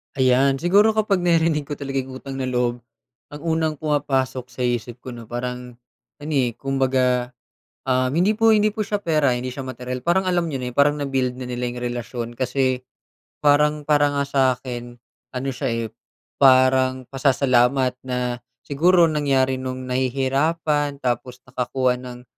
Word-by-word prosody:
Ayan 130 +1 +3
siguro 200 +9 +3
kapag 205 -3 +2
naririnig 165 -4 +1
ko 145 - -4
talaga 135 -1 -3
yung 130 0 -6
utang 135 -1 -6
na 130 - -2
loob 125 -1 0 0.5
ang 145 0 -10
unang 160 -2 0
pumapasok 135 -4 -1
sa 125 0 -6
isip 120 0 -2
ko 130 - -7
na 120 -2 -10
parang 125 0 -5 0.5
ano, 155 - -5
eh, 125 -5 +1
kumbaga, 130 -2 0 0.5
ah, 130 -1 +1
hindi 170 +10 +2
po, 225 0 +4
hindi 210 0 +3
po 220 - -11
siya 205 -1 -2
pera, 150 -6 +2
hindi 125 +1 -4
siya 130 0 -7
materyal 125 0 -5
parang 175 +8 +1
alam 180 -2 0
niyo 135 -5 -4
na 125 - -3
yung 125 - -4
parang 145 +1 +5
na-build 130 -2 -1
na 130 - -7
nila 125 0 -2
yung 120 0 -5
relasyon 120 -1 -4
kasi 130 +1 0 0.7
parang 150 +1 +3
para 145 -1 +3
nga 140 0 -1
sa 140 0 -1 0.2
akin 120 -1 -7 0.4
ano 130 +2 -3
siya, 130 +2 -3
eh, 115 -1 -2 0.5
parang 130 -1 +4
pasasalamat 130 -1 +2
na 125 -1 -3 0.2
siguro 170 +6 +4
nangyari 135 -4 +1
nung 130 0 -5
nahihirapan 140 +4 0
tapos 125 +1 -3
nakakuha 125 0 -1
ng 125 -1 -10
130 Hz, 165 wpm, -22 LUFS, 125-145 Hz, 0.7 s, parang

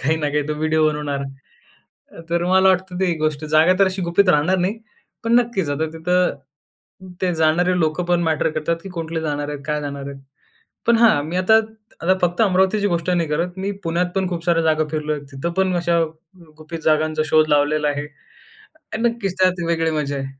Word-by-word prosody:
काही 155 +4 +1
ना 150 -2 -1
काही 150 0 0
तो 150 - -1
व्हिडिओ 155 0 +2
बनवणार. 145 -2 -3 0.9
अ, - - -11
तर 170 0 +1
मला 190 +1 +4
वाटतं 185 -1 0
ती 190 -2 +2
एक 165 - -2
गोष्ट; 155 -1 -1
जागा 155 +4 +4
तर 195 - +5
अशी 190 0 -2
गुपित 175 +3 +2
राहणार 180 +3 +3
नाही. 190 +5 -1 0.5
पण 230 - +2
नक्कीचं 195 -11 -2
आता 160 +2 -1
तिथं 180 +3 +1 0.9
ते 180 -2 0
जाणारे 170 +3 +2
लोकं 160 +2 0
पण 175 0 +1
मॅटर 160 -3 +1
करतात 155 +2 -1
की 195 - -8
कुठले 165 0 -3
जाणार 145 -2 -3
आहेत? 145 -1 -5
काय 150 -1 -1
जाणार 140 -1 -6
आहे? 140 -1 -9 0.7
पण 235 - +5
हां 220 -11 +4
मी 170 +3 -4
आता 185 +4 +3 0.5
आता 185 +3 +3
फक्त 175 +2 0
अमरावतीची 195 +1 +2
गोष्ट 170 -1 -1
नाही 170 -3 +1
करत. 165 +4 -1
मी 195 +1 -2
पुण्यात 170 +2 0
पण 190 -1 0
खूप 170 -2 -4
साऱ्या 170 -1 +2
जागा 155 -1 +2
फिरलो 155 -1 -2
आहे. 150 - -3
तिथं 135 +6 -4
पण 190 -1 +1
अशा 170 -1 +1 0.6
गुपित 160 +2 -7
जागांचा 155 0 +2
शोध 155 +1 +3
लावलेला 150 +1 +2
आहे 145 0 -2 0.9
आणि 230 +2 +1
नक्कीच, 220 -6 -3
त्यात 185 -2 +2
वेगळी 165 -1 +1
मजा 150 -2 -2
आहे. 135 0 -4
165 Hz, 200 wpm, -20 LUFS, 155-185 Hz, 0.9 s, तर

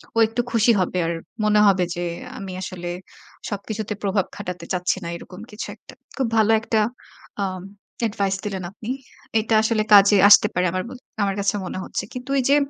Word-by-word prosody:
ও - - -3
একটু 225 +2 -1
খুশি 230 +1 +4
হবে। 185 0 -1
আর 170 - 0 0.3
মনে 210 0 +4
হবে 190 -2 +4
যে, 175 - -3 0.4
আমি 195 -2 -6
আসলে 175 -1 -5 0.6
সবকিছুতে 210 +1 -4
প্রভাব 195 -1 +1
খাটাতে 180 -1 -6
চাচ্ছি 180 +1 0
না 170 - -5
এরকম 185 +2 -12
কিছু 210 - -6
একটা। - - -16 0.2
খুব 265 -3 +1
ভালো 220 0 +4
একটা 225 -1 +1 0.6
আম 185 -1 -3 0.5
advice 195 -1 -1
দিলেন 195 -3 -3
আপনি। 215 +3 -9 0.5
এটা 220 +1 +1
আসলে 220 -1 +2
কাজে 200 0 +8
আসতে 210 0 +8
পারে 180 +1 +1
আমার 185 0 -2
ম - - -10 0.3
আমার 195 -1 0
কাছে 200 +1 +1
মনে 185 - -5
হচ্ছে। - - -4
কিন্তু 250 +1 -7
ওই - - +3
যে, 285 - +6
200 Hz, 185 wpm, -23 LUFS, 185-220 Hz, 0.6 s, কাজে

